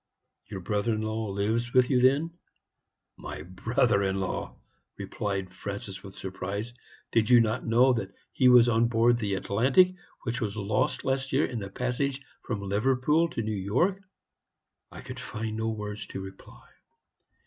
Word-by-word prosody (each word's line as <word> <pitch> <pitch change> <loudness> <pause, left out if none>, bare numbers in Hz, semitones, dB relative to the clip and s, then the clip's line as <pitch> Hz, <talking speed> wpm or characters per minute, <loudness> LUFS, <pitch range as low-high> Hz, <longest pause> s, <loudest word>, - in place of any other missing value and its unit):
"'Your 95 - -6
brother 105 +4 0
in 110 - -3
law 110 0 -2
lives 110 +5 -1
with 125 +1 +4
you, 125 -2 +4
then?' 140 +6 +3 0.9
"'My 75 - -7
brother 100 - +1
in 95 0 0
law!' 95 -2 -3 0.4
replied 95 -2 -4
Francis, 100 0 -6
with 95 -1 -12
surprise; 100 +4 -5 0.4
'did 115 0 +2
you 125 -1 +8
not 115 +2 0
know 125 +3 +5
that 100 -5 -3 0.2
he 130 -2 +4
was 120 -1 +7
on 115 0 +3
board 120 +1 +3
the 100 -4 -1
Atlantic, 130 - +3 0.3
which 120 +1 -3
was 105 -1 -3
lost 105 +1 0
last 135 0 -1
year 135 +3 +3
in 120 - -4
the 100 -1 -6
passage 125 +5 -2 0.2
from 105 -5 -4
Liverpool 130 +10 +2
to 115 - -3
New 110 - -2
York?' 125 - 0 0.9
"I - - -9
could - - -8
find 110 0 -5
no 110 0 -1
words 105 -1 -5
to - - -6
reply. 95 -10 -11
110 Hz, 160 wpm, -28 LUFS, 100-125 Hz, 0.9 s, you